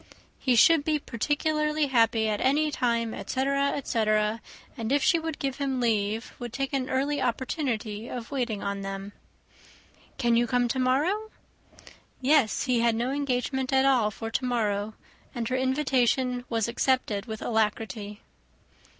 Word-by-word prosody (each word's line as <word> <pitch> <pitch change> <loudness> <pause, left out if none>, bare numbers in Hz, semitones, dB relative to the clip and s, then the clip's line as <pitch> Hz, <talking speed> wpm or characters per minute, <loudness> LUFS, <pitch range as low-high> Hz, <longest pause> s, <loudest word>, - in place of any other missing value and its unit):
He 255 -2 +2
should 310 +6 +6
be 305 0 +1
particularly 300 +4 0
happy 230 -4 +2
at 210 -1 -1
any 295 +3 +2
time, 235 -4 0
etc., 275 +1 0
etc.; 215 -4 0 0.3
and 225 +1 -4
if 285 0 +2
she 335 -3 +4
would 320 -2 -4
give 270 -1 -3
him 270 -2 -1
leave, 220 -1 0
would 240 -2 -6
take 270 +3 -3
an 260 -2 -1
early 275 +2 0
opportunity 235 -3 -2
of 240 0 -6
waiting 240 -7 -2
on 200 0 -3
them. 195 +1 -5 1.1
"Can 240 -3 +2
you 240 +1 +3
come 245 0 +2
to 260 - -1
morrow?" 310 +13 +1 0.9
Yes, 265 -3 +3
he 250 -3 +1
had 230 -1 +2
no 240 +3 -1
engagement 265 -1 -1
at 265 0 +4
all 250 -6 +3
for 225 +2 -6
to 255 - -1
morrow; 215 -4 -1 0.4
and 235 -2 -2
her 255 - 0
invitation 260 -2 +1
was 225 -2 0
accepted 235 -4 0
with 220 -1 -5
alacrity. 215 -1 -2
250 Hz, 150 wpm, -27 LUFS, 225-275 Hz, 1.1 s, should